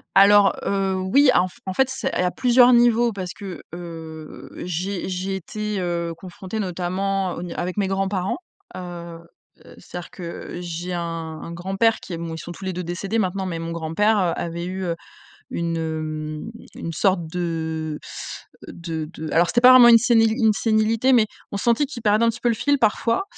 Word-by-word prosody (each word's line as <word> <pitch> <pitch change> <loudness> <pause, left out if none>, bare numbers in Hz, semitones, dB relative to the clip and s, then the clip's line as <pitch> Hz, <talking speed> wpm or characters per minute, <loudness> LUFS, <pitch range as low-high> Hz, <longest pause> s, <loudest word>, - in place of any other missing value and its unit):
Alors, 200 0 +7
heu, 195 -1 0 0.2
oui, 280 +1 +6
en 180 +1 +3
f 180 - -16
en 190 - -3
fait, 265 +3 +2
c'est 265 0 -3
et - - -3
il - - +4
y - - +2
a 180 - +2
plusieurs 250 -1 +5
niveaux 240 -1 +4
parce 185 -2 -5
que, 195 -3 -8
heu, 160 -3 -9
j'ai 180 +2 -3
j'ai 190 +1 -2
été, 210 +2 -4
heu, 170 -1 -2
confrontée 185 +4 -7
notamment 185 +1 -1
au - - -6
n 175 -1 -6
avec 180 +2 -3
mes 200 -2 +1
grands-parents, 195 +1 -1 0.4
heu 170 -2 -7 0.5
heu, - - -14
c'est-à-dire 175 -1 -8
que 175 -1 -7
j'ai 175 +1 -5
un 170 - -2 0.4
un 170 - -7
grand-père 195 +6 +1
qui 180 - -8
est 165 - -3
mou 165 0 -5
bon, - - -5
ils - - -7
sont 175 - -8
tous 190 +2 -9
les 185 - -2
deux 180 - -4
décédés 185 +6 -3
maintenant, 190 -1 -1
mais 170 -2 -3
mon 165 0 -4
grand-père, 170 +7 +1
heu, 180 -3 +1
avait 170 +1 -4
eu, 190 +1 -4
heu, 170 -2 -1 0.6
une, 170 -1 -2
hem, 155 +2 -4 0.2
une 165 - -5
sorte 175 0 +1
de 160 -2 -3 0.7
de 165 -2 -5
de 155 -1 -6
alors, 170 +1 +4
c'était 240 - +2
pas 250 +1 +9
vraiment 250 -2 +9
une 230 -1 +9
séni 230 -2 +4
une 225 -2 +3
sénilité, 225 +4 +2
mais 225 -3 +5 0.3
on 200 - -2
sentait 235 +7 +2
qu'il 265 -3 -8
perdait 215 +1 +3
un - - +4
petit 230 - -9
peu 240 - +2
le 230 - +2
fil 285 +5 +1
parfois. 230 - +1
185 Hz, 205 wpm, -23 LUFS, 170-215 Hz, 0.7 s, pas